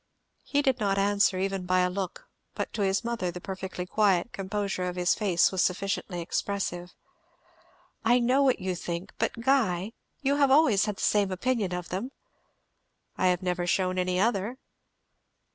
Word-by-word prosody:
He 285 0 0
did 265 -2 +1
not 200 -2 +1
answer, 200 -1 +3
even 190 -1 -2
by 185 0 +3
a 180 - +2
look, 185 -1 -5 0.3
but - - -4
to 215 - -3
his 195 +2 +1
mother 235 -6 -2
the 175 +1 -6
perfectly 190 -1 -5
quiet 200 +1 +1
composure 195 -1 -2
of 180 0 -3
his 180 0 +2
face 190 -5 +2
was 190 -2 +1
sufficiently 180 -1 -2
expressive. 180 0 -3 1.1
"I 235 +2 +4
know 250 +3 +3
what 265 -2 +3
you 185 -1 -2
think, 175 +2 -5
but 230 - -1
Guy, 225 -6 +1 0.3
you 280 +1 +2
always 270 -7 +5
had 210 -2 -2
the - - -7
same 205 -2 +2
opinion 210 0 -1
of 180 -1 -4
them?" 195 +8 -3 1.1
"I - - +1
have 180 0 +1
never 180 -1 -1
shewn 185 0 +1
any 180 0 0
other." 220 +3 0
195 Hz, 165 wpm, -28 LUFS, 180-220 Hz, 1.1 s, always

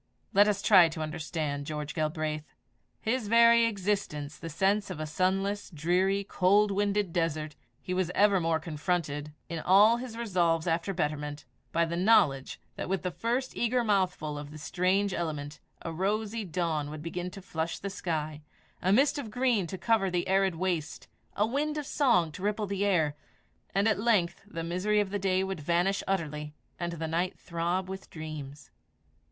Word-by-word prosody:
Let 205 +2 +6
us 205 -1 0
try 185 -5 +7
to 160 0 -6
understand 155 -2 -3
George 150 -1 -4
Galbraith. 155 -1 -3 0.5
His 230 0 -1
very 235 +1 +6
existence 190 -9 -2
the 165 - -6
sense 195 +6 +1
of 180 -4 -6
a 155 - -2
sunless, 195 +5 0
dreary, 185 +5 +1
cold 200 +2 +3
winded 200 -2 0
desert, 155 -3 -1 0.3
he 180 - -3
was 180 -2 0
evermore 180 -6 +3
confronted, 150 -2 -2 0.2
in 165 -1 -4
all 205 +7 +6
his 240 -2 -7
resolves 175 -8 +1
after 170 +3 0
betterment, 150 -3 -3 0.3
by 170 +1 +2
the 165 +1 -3
knowledge 180 -9 +3 0.2
that - - -4
with 195 -1 -1
the 180 - -1
first 245 +7 -2
eager 240 +1 +1
mouthful 180 -8 0
of 145 0 -8
the 155 - -10
strange 185 +5 +1
element, 150 -4 -4 0.2
a 165 - -4
rosy 210 +5 -1
dawn 160 -4 -1
would 150 0 -7
begin 175 +2 -4
to 190 - -10
flush 165 -3 -3
the 200 - -5
sky, 155 -5 -3 0.4
a 185 - +2
mist 280 +7 +4
of 240 -6 -5
green 235 -5 +1
to 190 - -5
cover 195 +2 +2
the 175 -1 -1
arid 190 -1 +2
waste, 170 -3 -2 0.3
a 210 - +3
wind 295 +6 -1
of 300 - -3
song 235 - +2
to 165 - -10
ripple 210 +1 0
the 200 0 -2
air, 160 -7 +2 0.6
and 200 +2 +3
at 215 -3 +2
length 205 -6 +2
the 165 -5 -5
misery 185 +5 +1
of 200 -2 0
the 205 - -1
day 190 -1 +1
would 190 -2 -3
vanish 175 +5 +1
utterly, 150 -5 -2 0.2
and 170 -1 -2
the 165 -1 -4
night 170 +3 -1
throb 175 +2 -2
with 190 0 -7
dreams. 150 -3 -8
180 Hz, 175 wpm, -29 LUFS, 160-205 Hz, 0.6 s, try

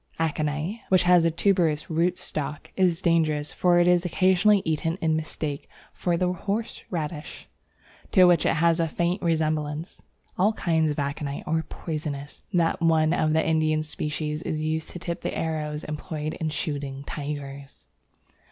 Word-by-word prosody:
Aconite, 155 +6 -1
which 185 -1 +5
has 175 -1 +5
a - - +5
tuberous 165 -3 +1
root 170 +2 +1
stock, 150 -5 -5
is 180 -2 +2
dangerous, 155 -3 +2
for 175 -1 +3
it 175 - +5
is 180 -1 +4
occasionally 190 +3 +3
eaten 160 +2 0
in 160 -1 +1
mistake 155 -2 -4 0.2
for 175 -1 0
the 180 +1 +1
horse 205 +5 -3
radish, 155 -3 -5 0.6
to 185 - +6
which 175 -3 +5
it - - +2
has 165 +1 +3
a 165 - +2
faint 175 +4 -1
resemblance. 155 -1 -1 0.4
All 205 +4 +4
kinds 160 -6 +1
of 150 - -2
aconite 140 0 -3
are 160 +1 +1
poisonous. 150 -3 -6
That 170 -3 +1
of 165 - +3
one 160 0 +3
of 155 -3 +1
the 160 0 +2
Indian 155 -1 +2
species 150 0 -3
is 155 - -3
used 155 0 -2
to - - -7
tip 170 0 -4
the - - -3
arrows 155 -2 -2
employed 155 0 -4
in 160 - -3
shooting 140 -2 -4
tigers. 140 -1 -7
160 Hz, 160 wpm, -26 LUFS, 150-175 Hz, 0.6 s, to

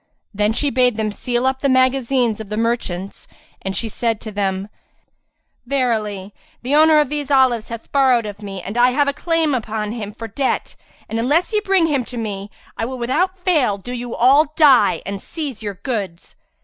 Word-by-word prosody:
Then 210 +1 +1
she 280 +5 0
bade 250 -2 +2
them 215 -1 -1
seal 240 +4 -2
up 265 0 +1
the 280 - +1
magazines 255 -3 +2
of 210 - -9
the 210 - -3
merchants 220 -5 -2 0.3
and 190 0 -4
said 225 0 -2
to 220 - -7
them, 195 -1 -2 1.0
"Verily 215 -7 -1 0.3
the 260 +3 -1
owner 310 +1 +6
of 295 - +1
these 295 -1 -3
olives 260 -5 +3
hath 230 -1 -8
borrowed 260 -5 +3
of 205 0 -7
me 195 -3 -7
and 215 +5 -4
I 245 +1 +6
have 285 +3 +1
a 280 - +1
claim 330 -1 0
upon 215 -3 -2
him 215 -3 -5
for 225 +2 -8
debt 260 +5 -2 0.3
and, 225 - -3
unless 305 - +1
ye 425 - +3
bring 385 -4 +2
him 285 -5 0
to 245 - -8
me, 205 -3 -4 0.3
I - - -3
will 255 +3 -4
without 315 +11 0
fail 310 - +1
do 225 +5 -9
you 245 -1 -5
all 280 +5 +4
die 285 -6 +5
and 200 0 -5
seize 290 -9 -5
your 205 -2 -4
goods." 195 -5 -5
240 Hz, 190 wpm, -20 LUFS, 210-275 Hz, 1.0 s, owner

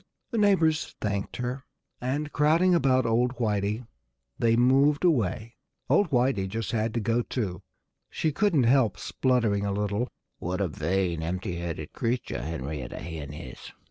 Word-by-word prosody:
The 230 - 0
neighbors 170 -7 +2
thanked 100 -2 -2
her. 125 +2 -3 0.4
And 145 +4 -2
crowding 165 +5 +4
about 130 -6 +3
old 120 +2 +2
Whitey 105 0 -1 0.5
they 115 -1 +3
moved 135 +6 +4
away. 115 - 0 0.3
Old 200 -4 +4
Whitey 125 -7 +2
just 110 +1 -3
had 110 -1 -1
to - - +2
go 115 +2 +1
too. 105 -7 -3 0.5
She 160 - -1
couldn't 170 -5 +2
help 120 -1 +3
spluttering 115 -6 +1
a 100 - -1
little. 105 +4 -1 0.3
"What 90 +2 -3
a 100 - +1
vain, 85 +2 -1
empty 90 +1 -3
headed 85 -3 -5
creature 120 - -2
Henrietta 75 -2 -5
Hen 80 -4 -6
is!" 70 -4 -9
115 Hz, 145 wpm, -27 LUFS, 95-135 Hz, 0.5 s, crowding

